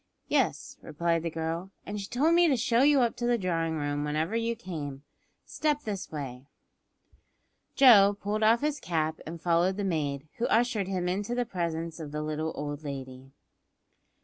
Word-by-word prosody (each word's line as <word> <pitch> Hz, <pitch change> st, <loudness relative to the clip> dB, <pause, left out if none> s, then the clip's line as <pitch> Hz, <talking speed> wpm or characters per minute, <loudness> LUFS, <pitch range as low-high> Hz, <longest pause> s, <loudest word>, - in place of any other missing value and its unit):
"Yes," -, -, 0 dB
replied 165 Hz, +2 st, -1 dB
the 165 Hz, -, -2 dB
girl, 165 Hz, +3 st, -3 dB, 0.2 s
"and 205 Hz, 0 st, -4 dB
she 195 Hz, -, -6 dB
told 290 Hz, +9 st, +2 dB
me 345 Hz, 0 st, +5 dB
to 275 Hz, -5 st, +3 dB
show 235 Hz, 0 st, +2 dB
you 285 Hz, -1 st, +5 dB
up 235 Hz, -2 st, +1 dB
to 240 Hz, -, -1 dB
the 240 Hz, 0 st, +3 dB
drawing 165 Hz, -5 st, -1 dB
room 145 Hz, 0 st, -2 dB
whenever 155 Hz, +7 st, -1 dB
you 230 Hz, 0 st, 0 dB
came. 145 Hz, -9 st, -6 dB, 0.4 s
Step 300 Hz, -1 st, -1 dB
this 200 Hz, -3 st, -5 dB
way." 135 Hz, -3 st, -6 dB, 1.3 s
Joe 205 Hz, -7 st, +7 dB
pulled 210 Hz, +2 st, -2 dB
off 225 Hz, +2 st, +4 dB
his 300 Hz, 0 st, -1 dB
cap 160 Hz, -2 st, -1 dB
and 165 Hz, +1 st, -6 dB
followed 175 Hz, +3 st, +2 dB
the 205 Hz, -, -2 dB
maid, 150 Hz, -5 st, -2 dB
who 235 Hz, -, +1 dB
ushered 225 Hz, -4 st, +1 dB
him 185 Hz, -2 st, -2 dB
into 205 Hz, +6 st, -2 dB
the 245 Hz, 0 st, 0 dB
presence 170 Hz, -5 st, -3 dB
of 150 Hz, -3 st, -7 dB
the 150 Hz, 0 st, -3 dB
little 155 Hz, +1 st, -2 dB
old 145 Hz, +1 st, -5 dB
lady. 135 Hz, -2 st, -7 dB
175 Hz, 175 wpm, -28 LUFS, 155-230 Hz, 1.3 s, Joe